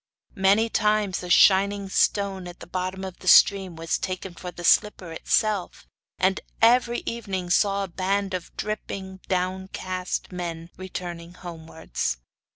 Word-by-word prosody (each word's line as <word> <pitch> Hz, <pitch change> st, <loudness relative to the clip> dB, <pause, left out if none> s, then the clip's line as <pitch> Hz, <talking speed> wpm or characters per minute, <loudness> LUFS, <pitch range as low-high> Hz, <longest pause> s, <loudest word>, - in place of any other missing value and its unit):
Many 200 Hz, +4 st, +4 dB
times 210 Hz, -3 st, +1 dB
a 180 Hz, -, -7 dB
shining 200 Hz, +2 st, +5 dB
stone 195 Hz, -1 st, +1 dB
at 175 Hz, -, -10 dB
the -, -, -9 dB
bottom 185 Hz, +1 st, -4 dB
of 190 Hz, -2 st, -7 dB
the 185 Hz, -, -11 dB
stream 190 Hz, -1 st, +6 dB
was 165 Hz, 0 st, -2 dB
taken 185 Hz, 0 st, -4 dB
for 180 Hz, +1 st, -7 dB
the 175 Hz, 0 st, -9 dB
slipper 185 Hz, -2 st, +3 dB
itself, 205 Hz, +3 st, 0 dB, 0.3 s
and 190 Hz, +1 st, +2 dB, 0.2 s
every 240 Hz, +1 st, +4 dB
evening 190 Hz, -6 st, -3 dB
saw 200 Hz, +1 st, +3 dB
a -, -, -4 dB
band 195 Hz, +2 st, -1 dB
of 180 Hz, -1 st, -4 dB
dripping 195 Hz, -3 st, -5 dB
downcast 185 Hz, 0 st, -3 dB
men 170 Hz, -2 st, -5 dB
returning 175 Hz, -2 st, -7 dB
homewards. 160 Hz, -, -4 dB
190 Hz, 140 wpm, -25 LUFS, 180-200 Hz, 0.3 s, stream